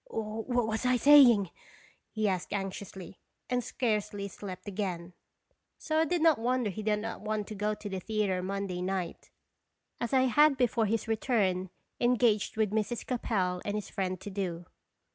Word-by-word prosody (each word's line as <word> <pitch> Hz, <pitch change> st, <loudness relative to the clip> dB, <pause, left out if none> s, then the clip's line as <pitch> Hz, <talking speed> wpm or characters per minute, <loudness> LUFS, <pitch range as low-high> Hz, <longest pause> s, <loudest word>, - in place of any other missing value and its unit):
"What 225 Hz, -, -2 dB
was 220 Hz, +2 st, -2 dB
I 250 Hz, 0 st, +3 dB
saying?" 240 Hz, -9 st, +7 dB, 0.6 s
he 215 Hz, -1 st, -1 dB
asked 185 Hz, -1 st, -2 dB
anxiously, 195 Hz, -2 st, -6 dB, 0.3 s
and 250 Hz, -1 st, +1 dB
scarcely 210 Hz, -5 st, -2 dB
slept 195 Hz, 0 st, -9 dB
again. 185 Hz, -3 st, -4 dB, 0.6 s
So 315 Hz, 0 st, -1 dB
I 320 Hz, -, +4 dB
did 340 Hz, +1 st, 0 dB
not 320 Hz, -7 st, +5 dB
wonder 245 Hz, -2 st, 0 dB
he 215 Hz, -, -6 dB
did 210 Hz, 0 st, +1 dB
not 225 Hz, +2 st, -5 dB
want 215 Hz, 0 st, -2 dB
to -, -, -5 dB
go 210 Hz, +1 st, -1 dB
to 210 Hz, -, -8 dB
the 190 Hz, -2 st, -3 dB
theatre 200 Hz, -2 st, -1 dB
Monday 190 Hz, -1 st, -3 dB
night, 185 Hz, -2 st, -3 dB, 0.7 s
as 235 Hz, -, -2 dB
I 265 Hz, -, +4 dB
had 285 Hz, +3 st, +4 dB
before 235 Hz, -3 st, +2 dB
his 225 Hz, +2 st, -1 dB
return 205 Hz, -5 st, 0 dB, 0.3 s
engaged 240 Hz, -4 st, +2 dB
with 215 Hz, -2 st, +1 dB
Mrs. 220 Hz, +2 st, -1 dB
Capel 190 Hz, -7 st, -1 dB
and 205 Hz, -, -2 dB
his 210 Hz, -, -4 dB
friend 185 Hz, -3 st, -2 dB
to 205 Hz, -, -7 dB
do. 180 Hz, -3 st, -3 dB
210 Hz, 165 wpm, -30 LUFS, 195-240 Hz, 0.7 s, saying